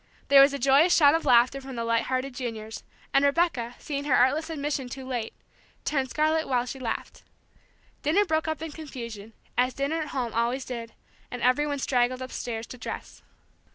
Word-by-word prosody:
There 275 0 +9
was 275 +1 +6
a 280 - -3
joyous 280 +7 +5
shout 285 -3 +6
of 325 -1 0
laughter 255 +1 +4
from 265 -1 -8
the 230 - -2
light 230 0 +1
hearted 260 +1 -2
juniors, 225 -3 -6 0.3
and 275 - +4
Rebecca, 280 -5 +1
seeing 285 -1 -4
her 270 -4 +3
artless 285 +7 +3
admission 290 -4 -3
too 265 +1 -7
late, 240 -4 -3 0.5
turned 270 -3 0
scarlet 310 +3 +1
while 250 -2 +1
she 265 +2 -7
laughed. 235 -3 -5 0.8
Dinner 365 +8 +3
broke 320 -2 0
up 315 0 -3
in 325 - -5
confusion, 235 -8 -8 0.3
as 250 0 +2
dinner 290 +4 -1
at 305 - -4
home 250 -5 -3
always 240 +3 0
did, 235 -2 -7 0.3
and 245 - -6
everybody 285 +4 +2
straggled 255 -1 0
upstairs 235 -3 -5
to 255 - -11
dress. - - -7
265 Hz, 185 wpm, -27 LUFS, 245-295 Hz, 0.8 s, There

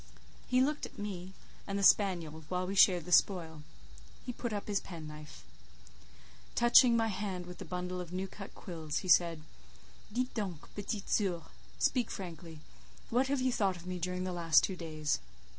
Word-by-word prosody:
He 255 0 +3
looked 295 +3 0
at - - -20
me 190 -2 -5 0.3
and 200 0 -2
the 200 - -1
spaniel 170 -7 +3
while 180 0 -1
we 190 - -3
shared 180 -3 +5
the 180 - -8
spoil; 165 -3 +3 0.6
he 250 - -4
put 235 0 -4
up 205 -1 -4
his 205 -2 +1
penknife. 155 -3 -9 1.1
Touching 240 0 +7
my 225 -1 +2
hand 190 -3 -3
with 180 0 -10
the 190 - -6
bundle 180 +1 -4
of 175 -1 -8
new 185 +1 -3
cut 195 +1 -10
quills, 160 -5 -4
he - - -4
said:—"Dites 165 - -1
donc, 190 -8 -5
petite 205 0 -4
soeur—speak 200 +5 -1
frankly—what 165 - -5
have 275 -1 0
you 255 0 +2
thought 195 -5 +1
of 175 - -12
me 180 0 -4
during 180 +1 -2
the 185 -1 -3
last 165 -2 +4
two 190 - -1
days?" 155 -3 -2
180 Hz, 165 wpm, -33 LUFS, 165-205 Hz, 1.1 s, Touching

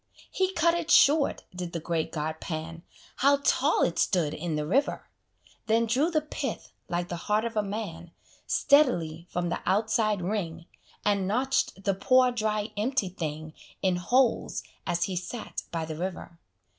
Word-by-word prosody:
He 375 0 +1
cut 335 -1 +3
it 340 -2 -2
short, 290 0 +5
did 180 -1 -5
the 170 - -2
great 165 0 -2
god 155 0 -3
Pan, 165 -1 -5 0.4
(How 280 +2 +4
tall - - +3
it - - 0
stood 165 -6 +2
in 160 +1 -3
the 150 0 -1
river!) 265 - 0 0.6
Then 225 +1 +3
drew 260 +8 +2
the 315 -3 +1
pith, 300 - -5 0.2
like 175 0 -1
the 175 - -4
heart 210 +2 +2
of 230 -1 -4
a 210 - +3
man, 195 -5 -5 0.4
Steadily 175 - +3
from 175 -1 -2
the - - -2
outside 215 -1 +1
ring, 170 -4 -3 0.4
And 200 -2 +2
notch'd 245 -3 0
the 195 - +2
poor, 255 +6 +4
dry, 215 -2 -1
empty 210 -2 0
thing 155 -3 -5 0.3
In 185 -2 +2
holes, 240 +8 +1 0.2
as 175 0 +1
he 190 - -2
sat 200 +6 -5
by 165 -2 -2
the 160 0 -5
river. 170 0 -5
195 Hz, 165 wpm, -28 LUFS, 170-240 Hz, 0.6 s, short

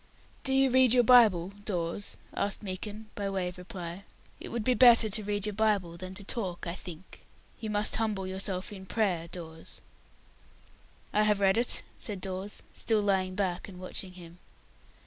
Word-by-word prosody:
"Do 265 - +2
you 270 -1 +4
read 255 -2 +5
your 245 -1 +5
Bible, 215 -8 +6
Dawes?" 180 -1 -2 0.2
asked 200 +1 0
Meekin, 210 +3 -6
by 200 -1 -3
way 190 -2 -1
of 180 - -11
reply. 180 0 -7 0.4
"It - - -8
would 235 -2 -2
be 255 - +3
better 235 -3 +7
to 215 +2 +1
read 205 0 -1
your 210 - -2
Bible 200 -5 +1
than 185 +2 -7
to 200 - -4
talk, 190 -4 -3
I 170 - -2
think. 180 -1 -10 0.4
You 220 - -4
must 210 0 +1
humble 215 -4 -1
yourself 190 0 -3
in 190 -1 -10
prayer, 185 -7 0
Dawes." 160 -2 -8 1.3
"I 210 - +4
have 210 -1 +3
read 195 -1 +4
it," 235 +2 0 0.2
said 205 -3 -3
Dawes, 190 +2 -5
still 220 -2 +1
lying 190 -2 +1
back 185 -3 -1
and 180 -2 -11
watching 185 0 -6
him. 175 -1 -12
195 Hz, 175 wpm, -30 LUFS, 185-215 Hz, 1.3 s, better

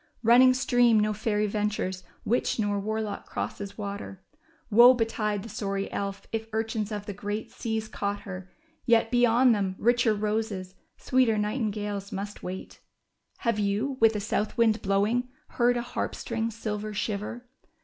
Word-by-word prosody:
Bunning 250 +3 +7
stream 245 -3 +4
no 210 0 +1
fairy 210 0 0
ventures, 205 -3 -2 0.2
witch 240 +3 +1
nor 205 -2 0
warlock 215 0 -3
crosses 200 -1 -5
water. 200 -2 -6 0.5
Woe 240 +4 +8
betide 215 -3 -1
the - - -8
sorry 195 -1 -3
elf 200 0 -4
if 225 0 -3
urchins 220 -1 -2
of 205 -1 -4
the 205 - -5
great 205 +2 -4
seas 220 -1 -3
caught 205 -1 -3
her! 185 -1 -8 0.4
Yet, 225 -1 +4
beyond 245 0 +5
them, 195 -3 -1
richer 240 -1 +3
roses, 210 -3 -2 0.2
sweeter 255 -4 +2
nightingales 210 -2 -2
must 205 0 -5
wait.'' 185 +1 -7 0.6
Have 230 -3 +1
you, 210 +7 0
with 225 -1 +5
a - - 0
south 210 0 -2
wind 225 -1 +3
blowing, 210 +6 +1 0.2
heard 245 0 +2
a 240 - -2
harp. 245 - -3
string's 230 -1 -3
silver 215 -1 -4
shiver 215 +4 -3
215 Hz, 150 wpm, -27 LUFS, 205-230 Hz, 0.6 s, Woe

